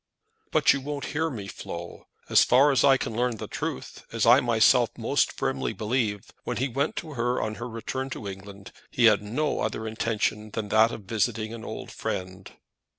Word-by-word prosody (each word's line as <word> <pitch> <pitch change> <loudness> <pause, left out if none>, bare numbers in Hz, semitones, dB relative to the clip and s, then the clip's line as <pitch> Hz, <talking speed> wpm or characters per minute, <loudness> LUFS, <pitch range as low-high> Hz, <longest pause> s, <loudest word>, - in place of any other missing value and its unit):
"But - - +4
you 140 - -3
won't 145 +1 -4
hear 160 +2 0
me, 110 -9 -6
Flo. 85 -3 -8 0.2
As - - +6
far 135 +4 +5
as 130 -4 +3
I 135 -1 +6
can 115 - -4
learn 120 -1 0
the - - -5
truth, - - -5
as - - 0
I - - +8
myself - - +4
most - - +1
firmly 65 -1 -2
believe, 105 -3 -2
when - - -3
he 130 - 0
went 140 +4 -1
to 155 -2 -6
her 120 -1 0
on 110 0 -2
her 120 - -4
return 130 +4 -4
to 105 - -7
England, 100 0 -9 0.2
he 120 - +2
had 105 -2 +6
no 125 +9 -1
other 110 - -2
intention 110 -1 -1
than 105 -1 -4
that 110 +1 +5
of 110 - -7
visiting 110 +1 -1
an 115 -1 -8
old - - -7
friend." 95 +1 -5
115 Hz, 195 wpm, -26 LUFS, 105-130 Hz, 0.2 s, I